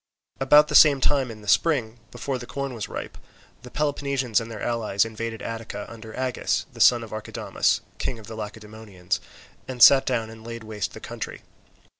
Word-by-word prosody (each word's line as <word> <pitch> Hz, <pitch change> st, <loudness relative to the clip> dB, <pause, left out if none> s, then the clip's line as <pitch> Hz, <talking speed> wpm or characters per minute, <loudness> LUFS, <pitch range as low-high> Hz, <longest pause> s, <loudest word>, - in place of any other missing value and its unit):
About 150 Hz, +3 st, +6 dB
the -, -, -5 dB
same 145 Hz, -3 st, +7 dB
time 135 Hz, -1 st, +1 dB
in 110 Hz, -2 st, -10 dB
the -, -, -13 dB
spring, 120 Hz, -4 st, +2 dB
before 135 Hz, -2 st, -4 dB
the 120 Hz, -, -9 dB
corn 140 Hz, -1 st, -4 dB
was 115 Hz, -3 st, -5 dB
ripe, -, -, -7 dB, 0.4 s
the 125 Hz, -, -11 dB
Peloponnesians 140 Hz, -5 st, 0 dB
and 115 Hz, -, -7 dB
their 110 Hz, -2 st, -7 dB
allies 110 Hz, -4 st, +1 dB
invaded 115 Hz, 0 st, -5 dB
Attica 115 Hz, -2 st, -5 dB
under 110 Hz, -1 st, -10 dB
Agis, 130 Hz, -2 st, -1 dB
the -, -, -6 dB
son 120 Hz, -1 st, +6 dB
of 115 Hz, -, -10 dB
Archidamus, 110 Hz, 0 st, -1 dB, 0.2 s
king 125 Hz, -, -3 dB
of 110 Hz, -, -12 dB
the 110 Hz, -, -8 dB
Lacedaemonians, 105 Hz, -3 st, -5 dB, 0.5 s
and 125 Hz, -2 st, +2 dB
sat 135 Hz, -1 st, +8 dB
down 115 Hz, -3 st, -1 dB
and 110 Hz, 0 st, -13 dB
laid 115 Hz, 0 st, -7 dB
waste 105 Hz, -3 st, -4 dB
the -, -, -9 dB
country. -, -, -7 dB
115 Hz, 185 wpm, -25 LUFS, 110-130 Hz, 0.5 s, sat